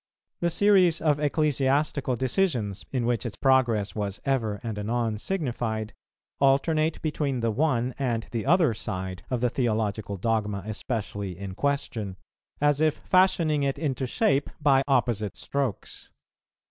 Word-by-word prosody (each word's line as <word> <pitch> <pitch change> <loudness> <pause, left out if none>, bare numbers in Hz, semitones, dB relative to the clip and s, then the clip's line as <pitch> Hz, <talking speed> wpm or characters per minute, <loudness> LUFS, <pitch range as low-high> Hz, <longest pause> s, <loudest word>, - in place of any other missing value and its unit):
The 170 - +1
series 185 -2 +4
of 150 -2 +2
ecclesiastical 145 -2 +1
decisions, 125 - 0
in 125 -3 -1
which 120 -1 0
its 120 -4 -5
progress 120 -7 +2
was 100 -2 -3
ever 115 -7 0
and 110 -3 -4
anon 110 0 -1
signified, 120 - -2 0.5
alternate 155 +4 +2
between 145 -5 -1
the 115 -1 +1
one 130 -1 +1
and 120 -4 -1
the 115 +2 -3
other 165 -5 +4
side 95 -3 -5
of 125 -2 -1
the 125 - +2
theological 110 -5 -1
dogma 105 -1 -1
especially 105 -4 -4
in 100 -1 -6
question, 110 -7 -2 0.4
as 145 0 +2
if 155 -1 +3
fashioning 170 -5 +2
it 140 -1 0
into 135 -4 -2
shape 140 - +1
by 140 -3 +4
opposite 120 -6 +1
strokes. 135 -7 -4
125 Hz, 135 wpm, -26 LUFS, 110-145 Hz, 0.5 s, series